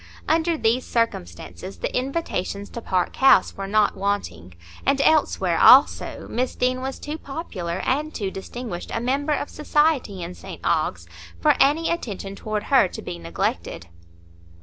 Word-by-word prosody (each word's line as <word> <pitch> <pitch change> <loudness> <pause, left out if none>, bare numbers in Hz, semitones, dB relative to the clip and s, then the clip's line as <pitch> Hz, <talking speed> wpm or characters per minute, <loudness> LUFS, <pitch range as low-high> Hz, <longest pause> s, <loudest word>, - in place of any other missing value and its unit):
Under 325 +1 +2
these 235 0 +1
circumstances 85 - -3
the - - -4
invitations 250 - -3
to 235 - -6
Park 185 -4 -1
House 270 - +5
were 195 0 -5
not 210 +1 +2
wanting; 190 - -3 0.3
and 275 0 +2
elsewhere, 310 +2 +2
also, - - +5
Miss 255 +1 -2
Deane 255 0 0
was 265 +1 -4
too 300 +2 -6
popular 190 - -5
and 300 +4 0
too 200 -8 -3
distinguished 195 -1 -7
a - - 0
member 275 +5 0
of 290 - -2
society 295 - 0
in 170 +1 -6
St 190 0 -10
Ogg's 95 - 0 0.3
for - - +4
any 300 +4 +3
attention 200 - -4
toward 210 0 -3
her 265 -8 +4
to - - -8
be 85 - -6
neglected. 85 +1 -3
225 Hz, 150 wpm, -23 LUFS, 180-275 Hz, 0.3 s, House